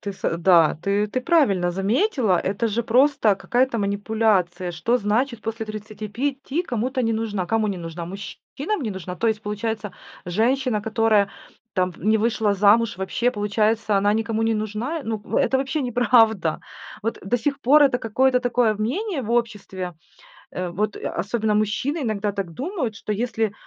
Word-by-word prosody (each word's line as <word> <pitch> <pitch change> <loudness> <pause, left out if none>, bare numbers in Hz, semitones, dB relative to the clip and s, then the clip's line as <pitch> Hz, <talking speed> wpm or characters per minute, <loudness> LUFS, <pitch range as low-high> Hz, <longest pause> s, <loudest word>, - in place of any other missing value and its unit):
Ты 200 - -5
с 180 -3 -2
да, 170 -3 +5
ты 200 +1 +1
ты 240 +5 -2
правильно 250 - +2
заметила, 215 - +1
это 200 +6 -1
же 225 +3 -1
просто 250 -2 +3
какая-то 245 +4 0
манипуляция: 200 -4 0
что 175 +9 +1
значит 230 +2 -1
после 225 0 -4
35 220 - -4
кому-то 255 -3 -2
не 225 -1 +1
нужна? 215 -4 -2
Кому 220 +3 +1
не 200 - -2
нужна, 170 0 -6
мужчинам 205 - -5
не 225 - -2
нужна? 185 -2 -6
То 230 - -1
есть 220 -1 -1
получается, 210 -1 -3 0.3
женщина, 230 +5 +1
которая 220 -1 +2 0.5
там 185 -2 +1
п - - -17
не 215 +3 +3
вышла 220 -2 +1
замуж, 210 +2 +4
вообще 190 +6 0
получается, 210 0 0
она 205 +1 +3
никому 225 0 -1
не 225 0 +2
нужна. 215 +9 -3
Ну 220 -1 -3 0.2
это 265 - +2
вообще 275 +2 -1
неправда. 225 -8 +3 0.4
Вот 225 +2 -2
до 195 +5 0
сих 280 +4 -2
пор 290 +4 +6
это 270 -3 +3
какое-то 250 +3 +2
такое 245 -3 +2
мнение 275 - -2
в 225 - -5
обществе, 210 -6 -2 0.6
э 180 -1 -3
вот, 205 +4 -2
э, - - -11
особенно 215 +1 -1
мужчины 215 +9 0
иногда 215 -4 -1
так 195 -4 -5
думают, 270 - -3
что 210 - -4
если 220 -1 -1
220 Hz, 165 wpm, -23 LUFS, 200-245 Hz, 0.6 s, пор